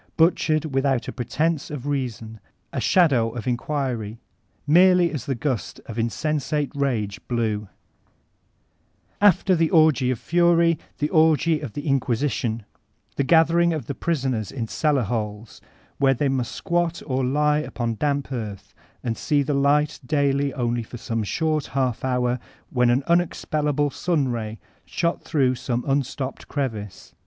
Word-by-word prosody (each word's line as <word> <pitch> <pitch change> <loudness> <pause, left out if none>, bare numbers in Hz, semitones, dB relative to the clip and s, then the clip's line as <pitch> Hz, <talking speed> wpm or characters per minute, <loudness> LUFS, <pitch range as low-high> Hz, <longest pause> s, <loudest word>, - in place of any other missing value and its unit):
Butchered 160 -2 +3
without 135 -2 +1
a - - -3
pretence 150 +5 -1
of 145 -3 -6
reason, 120 -6 -3 0.3
a - - -2
shadow 135 -11 +3
of 120 - -5
inquiry, 120 -4 -2 0.5
mere 180 +5 +6
ly 180 -1 +4
as 155 -5 -3
the 135 - 0
gust 125 -3 -3
of 115 0 -6
insensate 150 +4 -1
rage 120 -8 -1
blewl 110 -4 -1 1.5
After 195 -2 +5
the 165 -1 +2
orgy 155 -6 +4
of 130 - 0
fury, 170 +2 +3 0.2
the 150 - -1
orgy 160 -1 +3
of 140 -8 -7
the 145 - -5
mqnisition* 130 -3 0 0.5
The 140 - +1
gathering 170 +3 +4
of 155 -7 -4
the 140 - -4
prisoners 130 - -2
in 120 -4 -4
cellar 145 0 +1
holes, 105 0 -4 0.4
where 135 -1 +4
they 140 +3 0
must 130 -3 -1
squat 175 -2 -1
or 130 -1 -1
lie 150 +3 +2
upon 120 -6 -3
danq> 140 0 -1
earth, 110 -6 -6 0.3
and 115 -2 -1
see 145 +4 +1
the 145 - -1
light 145 +2 +2
daily 140 0 +1
only 120 -2 0
for 115 +2 -9
some 115 0 -3
short 155 +6 -1
half 130 -4 0
hour 125 -1 0 0.3
when 125 -2 +3
an 125 +3 +2
unexpellable 150 -4 +1
sun 155 -6 0
ray 110 -2 -4 0.3
shot 170 0 -1
through 135 -4 +1
some 120 -1 -2
unstof^d 135 -1 -2
crevice. 110 -9 -4
135 Hz, 145 wpm, -23 LUFS, 120-155 Hz, 1.5 s, mere